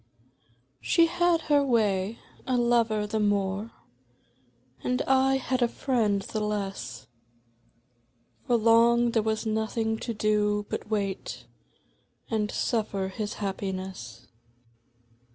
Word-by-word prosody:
She 335 - +4
had 340 0 +2
her 290 -2 +3
way; 215 -4 +1 0.3
a 255 -1 +1
lover 230 -3 +2
the 215 +1 -2
more, 205 0 0 1.1
And 250 0 0
I 265 0 +3
had 260 -1 -2
a 240 - +4
friend 220 -6 0
the 215 - -4
less. 205 -2 -4 1.4
For 245 - +3
long 235 +1 +4
there 225 - +2
was 220 +1 -1
nothing 220 0 -1
to 235 - -4
do 210 -1 +1
but - - -5
wait 200 -3 -3 0.9
And 210 -2 0
suffer 205 -5 -1
his 205 +2 -4
happiness. 190 - -5
220 Hz, 110 wpm, -27 LUFS, 205-240 Hz, 1.4 s, She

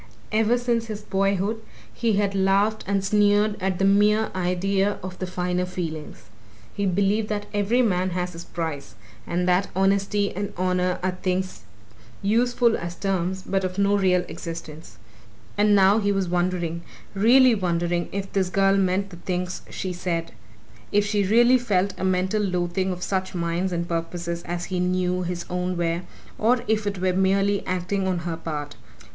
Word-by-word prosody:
Ever 225 +2 +3
since 235 -2 0
his 215 -1 -5
boyhood 195 +3 0 0.3
he 230 -2 0
had 200 -1 +1
laughed 195 +3 +2
and 195 -1 0
sneered 205 +1 +3
at 190 -1 0
the 195 - +1
mere 210 +2 +3
idea 190 +2 0
of 185 0 -7
the 185 - -3
finer 180 0 -1
feelings 165 -4 -6 0.5
he 200 -1 -1
believed 200 +3 +1
that 205 -1 -2
every 210 +5 +2
man 185 -4 +1
has 180 0 -3
his 165 +1 -8
price 145 - -5 0.3
and 180 +1 -1
that 180 +2 +3
honesty 200 +1 +1
and 200 +1 -4
honour 180 0 +1
are 185 0 -2
things 185 - -2 0.6
useful 235 +2 +3
as 170 +1 -5
terms 190 0 -2
but 195 0 -1
of 185 0 -3
no 200 0 +3
real 185 -2 +3
existence. 165 -1 -8 0.6
And 205 0 +4
now 195 +2 +5
he 205 -1 +1
was 195 -2 0
wondering 175 -1 -1 0.3
really 245 +5 +6
wondering 175 -3 -1
if 195 0 -5
this 190 -2 +1
girl 195 +1 +3
meant 195 +1 +1
the 175 - -10
things 180 +1 -3
she 185 -1 -4
said: 170 -2 -3 0.6
if 205 0 +3
she 205 0 +1
really 240 +4 +5
felt 200 -5 +1
a - - -3
mental 185 +3 +1
loathing 180 -1 -1
of 180 0 -5
such 190 -1 -2
minds 170 +2 -1
and 170 -1 -2
purposes 170 0 -3
as 175 +1 -3
he 180 - 0
knew 180 0 0
his 175 -1 -4
own 180 0 -2
were, 170 0 0 0.4
or 240 +2 +2
if 215 -1 +1
it 200 -1 -2
were 185 0 +1
merely 195 +2 +2
acting 185 +2 -1
on 185 -1 0
her 170 -2 -2
part. 150 -3 -5
190 Hz, 170 wpm, -24 LUFS, 180-205 Hz, 0.6 s, really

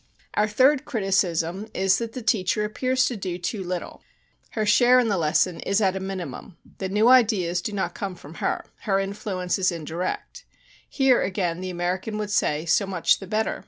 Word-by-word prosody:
"Our 210 - +2
third 260 +6 +3
criticism 195 - 0
is 190 0 +3
that 230 -1 -5
the 255 - -6
teacher 210 0 +1
appears 255 +4 +1
to 245 - -2
do 185 -4 -4
too 190 +3 -3
little; 180 -1 -5 0.5
her 215 -1 0
share 245 +4 +5
in 240 -3 +1
the 200 - +1
lesson 165 +3 +1
is 195 +2 0
at 195 -3 +2
a - - -2
minimum; 190 -1 -6 0.2
the 190 - -3
new 210 +4 +3
ideas 205 -9 +4
do 210 - -4
not 200 -2 -2
come 195 -2 -5
from 155 -2 -12
her, - - -1
her 195 -3 0
influence 195 -2 -2
is 185 0 +2
indirect. 170 +2 -5 0.5
Here, 270 -3 +3
again, 180 -3 -1
the 185 - -4
American 180 +4 -2
would 210 -1 -3
say, 150 -5 +1
so 195 +4 +2
much 180 -3 +2
the 195 - -9
better. 215 +3 -1
195 Hz, 190 wpm, -24 LUFS, 180-215 Hz, 0.5 s, share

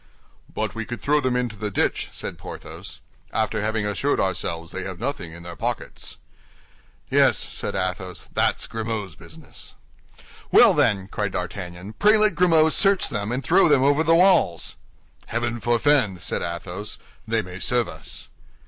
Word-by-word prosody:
"But - - -3
we 115 - -4
could 120 +2 -6
throw 150 +1 +2
them 130 -2 0
into 125 -3 -1
the 105 +1 -4
ditch," 100 - 0
said - - -6
Porthos, - - -9 0.3
"after 110 -1 -1
having 110 0 -1
assured 120 +8 0
ourselves 85 -3 -2
they 95 - -5
have 95 -2 -6
nothing 120 - -4
in 85 +1 -11
their 85 -1 -8
pockets." - - -5 0.9
"Yes," - - +4
said - - -4
Athos, 95 -1 -3
"that's - - +1
Grimaud's 110 -5 -4
business." - - -13 0.8
"Well, - - +7
then," 95 -2 +2
cried 105 -1 -3
D'Artagnan, 90 +2 -5
"pray 210 +1 +6
let 215 -2 +3
Grimaud 165 -3 +4
search 195 -1 +3
them 105 0 -3
and 130 +2 -2
throw 180 0 +4
them 140 -3 +4
over 145 +3 +3
the 165 +1 +4
walls." 175 - +3 0.5
"Heaven 120 +1 -2
forfend!" 120 - +2
said - - -3
Athos; 90 +4 -5 0.3
"they 110 0 +1
may 90 0 -9
serve 120 +2 +1
us." - - -5
110 Hz, 155 wpm, -23 LUFS, 95-140 Hz, 0.9 s, Well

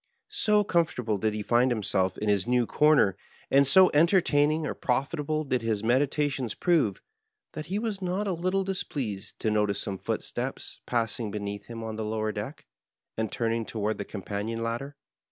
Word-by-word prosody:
So 210 -1 +3
comfortable 125 - 0
did 110 +1 0
he 105 - -3
find 120 +4 +3
himself 100 -5 0
in 105 - -3
his 100 +1 +2
new 125 -1 +3
comer, 150 -9 +4 0.4
and 140 0 +5
so 185 +6 +7
entertaining 155 -2 +3
or - - -2
profitable 150 +4 -1
did 130 -4 -1
his 110 -2 -1
meditations 130 0 +1
prove, 155 - +1 0.5
that 155 0 -6
he 190 +4 -2
was 215 -3 -3
not 185 +3 -1
a 195 - 0
little 185 +3 0
displeased 135 - -4
to 110 - +1
notice 105 -1 +1
some 95 -2 -4
footsteps - - -4
passing 115 -2 0
beneath 100 0 -5
him 115 -1 -7
on 110 -1 -5
the 110 - -2
lower 110 0 -1
deck, 110 +8 -6 0.5
and 110 -1 -2
turning 115 0 0
toward 110 -1 -2
the - - -1
companion 105 +3 -4
ladder. 120 +5 -4
120 Hz, 170 wpm, -27 LUFS, 105-155 Hz, 0.5 s, so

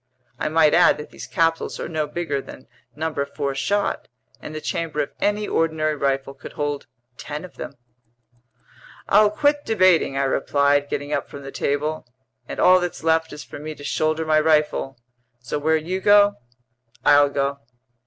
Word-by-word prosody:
I - - -1
might 155 -1 +4
add - - +5
that 150 - -9
these - - -9
capsules 165 0 0
are - - -4
no 155 -2 -2
bigger 155 -5 -3
than 130 - -12 0.3
number 155 -1 -2
4 140 0 -3
shot, 200 +9 -1 0.3
and 155 - -9
the - - -3
chamber 160 -1 -3
of - - -9
any 210 +1 0
ordinary 155 -1 0
rifle 135 -1 -1
could 135 - -11
hold 145 -1 -3 0.3
ten 150 +3 -6
of 180 - -15
them." - - -7 1.3
"I'll 210 +1 +5
quit 290 +7 +1
debating," 185 -10 +3
I 140 - +1
replied, 140 +1 +1
getting 145 +1 -3
up - - -2
from 140 - -9
the 135 - -8
table. 150 +1 -2 0.4
"And - - -6
all 185 0 +6
that's 175 -2 -4
left 160 0 +2
is 150 - -8
for - - -10
me 155 +1 -6
to 145 - -12
shoulder 155 +2 0
my 155 0 +3
rifle. 150 -4 +1 0.4
So 125 +4 -4
where 160 +2 +2
you 180 +5 -3
go, 205 +1 +6 0.7
I'll 145 0 +6
go." 140 0 -1
155 Hz, 175 wpm, -22 LUFS, 140-165 Hz, 1.3 s, all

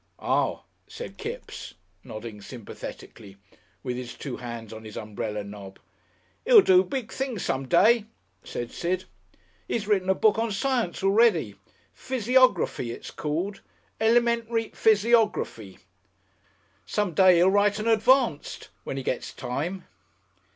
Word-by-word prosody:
"Ah!" - - 0 0.2
said 485 - -9
Kipps, 455 +3 -7 0.3
nodding 110 -1 -8
sympathetically, 105 -3 -10 0.5
with 125 -2 -3
his 125 -1 -7
two 135 -4 -6
hands 115 -3 -7
on 110 0 -9
his 110 -1 -9
umbrella 105 -1 -4
knob. 100 -1 -10 0.7
"He'll 470 -3 +8
do 185 0 +6
big 225 +4 -5
things 260 -7 -3
some 135 0 -2
day," 220 - +4 0.4
said 120 -1 -5
Sid. 185 +2 -2 0.6
"He's 210 -3 -2
written 190 -3 +1
a 190 - +4
book 215 +2 +3
on 230 -1 0
science 235 -4 -1
already. 220 +4 +3 0.4
'Physiography,' 250 - +2
it's 115 - -7
called. 170 +7 -3 0.4
'Elementary 230 0 +2
Physiography'! 215 - +1 1.1
Some 205 -4 -1
day 185 +2 +6
he'll 180 +3 +5
write 205 0 +3
an 215 +1 -3
Advanced 230 - +2
when 135 - -5
he 135 - -4
gets 125 - -3
time." 175 +9 -4
190 Hz, 125 wpm, -26 LUFS, -, 1.1 s, He'll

